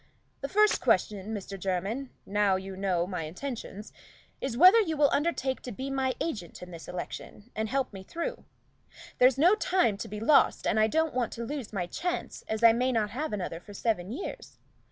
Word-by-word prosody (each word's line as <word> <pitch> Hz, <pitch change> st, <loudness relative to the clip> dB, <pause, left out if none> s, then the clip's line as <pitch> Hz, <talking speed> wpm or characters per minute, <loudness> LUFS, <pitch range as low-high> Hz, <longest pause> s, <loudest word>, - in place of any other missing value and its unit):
"The 275 Hz, -, -4 dB
first 425 Hz, +1 st, +4 dB
question, 205 Hz, 0 st, +1 dB
Mr. 200 Hz, -2 st, -5 dB
Jermyn, 195 Hz, +8 st, -2 dB, 0.2 s
now 205 Hz, -1 st, +2 dB
you 190 Hz, 0 st, -5 dB
know 185 Hz, -3 st, 0 dB
my 180 Hz, -4 st, -4 dB
intentions, 210 Hz, -, -7 dB, 0.5 s
is, 250 Hz, -3 st, -2 dB
whether 370 Hz, -, +8 dB
you 320 Hz, -7 st, -2 dB
will 290 Hz, -1 st, +4 dB
undertake 280 Hz, -4 st, 0 dB
to 250 Hz, -, -6 dB
be 265 Hz, +5 st, -5 dB
my 265 Hz, -1 st, 0 dB
agent 205 Hz, -, -4 dB
in 180 Hz, -, -10 dB
this 165 Hz, -1 st, -9 dB
election, 200 Hz, +5 st, -7 dB
and 220 Hz, 0 st, -2 dB
help 265 Hz, -3 st, -1 dB
me 195 Hz, -, -7 dB
through? 340 Hz, -, -5 dB, 0.8 s
There's 255 Hz, +1 st, +6 dB
no 340 Hz, +7 st, +6 dB
time 365 Hz, -, +2 dB
to -, -, -5 dB
be 210 Hz, +1 st, -6 dB
lost, 275 Hz, +7 st, +4 dB
and 220 Hz, -, +2 dB
I 215 Hz, -, +5 dB
don't 320 Hz, +6 st, +1 dB
want 250 Hz, -3 st, 0 dB
to 235 Hz, -, -5 dB
lose 275 Hz, -3 st, -5 dB
my 190 Hz, -4 st, -2 dB
chance, 355 Hz, -, -4 dB
as 220 Hz, +1 st, -3 dB
I 230 Hz, -1 st, +9 dB
may 250 Hz, +3 st, +1 dB
not 215 Hz, -4 st, 0 dB
have 295 Hz, +8 st, -3 dB
another 180 Hz, -5 st, -3 dB
for 205 Hz, +3 st, -13 dB
seven 205 Hz, -4 st, -1 dB
years. 335 Hz, +11 st, -7 dB
225 Hz, 195 wpm, -29 LUFS, 195-275 Hz, 0.8 s, I